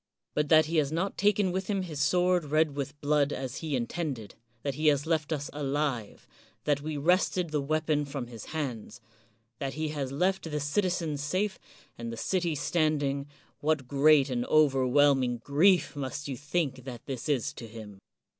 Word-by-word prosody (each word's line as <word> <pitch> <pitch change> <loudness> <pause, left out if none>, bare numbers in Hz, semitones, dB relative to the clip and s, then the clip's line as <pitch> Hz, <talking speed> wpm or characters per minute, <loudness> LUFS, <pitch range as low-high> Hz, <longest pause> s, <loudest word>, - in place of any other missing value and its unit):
But 150 -1 0
that 155 -1 +7
he 165 +2 -1
has 145 -2 +2
not 180 +5 -1
taken 205 -2 +2
with 190 +1 -2
him 195 -3 0
his 155 -5 -4
sword 180 +2 +3
red 155 0 +2
with 140 +1 -4
blood 145 -1 +2
as 130 -3 -4
he 155 -4 -2
intended, 125 - -3 0.2
— 115 -1 -40
that 140 - -1
he 155 +3 0
has 145 -1 +3
left 160 -2 0
us 145 -2 -2
alive, 140 -6 -2 0.2
— - - -33
that 145 -1 +1
we 150 0 -4
wrested 175 +2 +2
the 150 -2 0
weapon 155 0 0
from 140 -3 -5
his 115 -3 -9
hands, 125 -7 -5 0.3
— 115 +1 -39
^that 135 -1 -2
he 155 +1 -2
has 140 -3 -3
left 180 +4 0
the 150 -1 -2
citizens 160 -1 0
safe 190 +7 -1 0.4
and 115 0 -4
the 115 - -6
city 175 +4 0
standing, 145 -3 0 0.3
what 150 -4 0
great 140 0 +4
and 120 -1 0
overwhelming 135 -3 +4
grief 155 +9 +3
must 140 +1 -4
you 135 - -3
think 145 -1 -2
that 125 -2 -8
this 135 +1 -5
is 135 -6 0
to 115 - -9
him! 105 -3 -10
145 Hz, 185 wpm, -29 LUFS, 135-160 Hz, 0.4 s, that